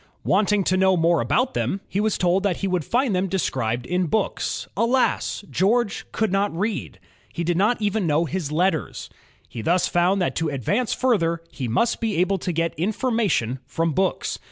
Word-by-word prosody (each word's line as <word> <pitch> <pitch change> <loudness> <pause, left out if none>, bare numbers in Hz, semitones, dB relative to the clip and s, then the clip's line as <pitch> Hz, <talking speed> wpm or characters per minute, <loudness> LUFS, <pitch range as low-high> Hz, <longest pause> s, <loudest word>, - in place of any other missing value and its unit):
Wanting 205 0 +2
to 185 +1 +1
know 190 -1 +3
more 165 0 +3
about 250 - +1
them, 195 - -1
he 195 - -2
was 215 0 +1
told 180 +1 +2
that 200 -3 0
he 195 - -2
would 180 -3 0
find 240 - +1
them 185 +1 0
described 125 -10 -1
in 180 0 0
books. 215 +6 -1
Alas! 235 -1 +1
George 215 +3 0
could 220 -3 0
not 200 +1 +1
read, 210 +2 -3 0.2
— - - -32
he 170 - -2
did 175 +1 0
not 210 +7 +2
even 210 -3 0
know 155 +2 +2
his 165 -3 -3
letters. 165 0 -1 0.4
He 115 - -7
thus 175 +9 +2
found 180 +3 +2
that 180 - -1
to 165 -1 0
advance 200 - -1
further, 170 -10 +1
he 130 -1 -4
must 125 - +1
be 220 -3 -1
able 185 +2 +1
to 180 - -2
get 165 0 -1
information 200 - 0
from 165 +2 -1
books. 190 +6 -1
185 Hz, 190 wpm, -23 LUFS, 165-210 Hz, 0.4 s, know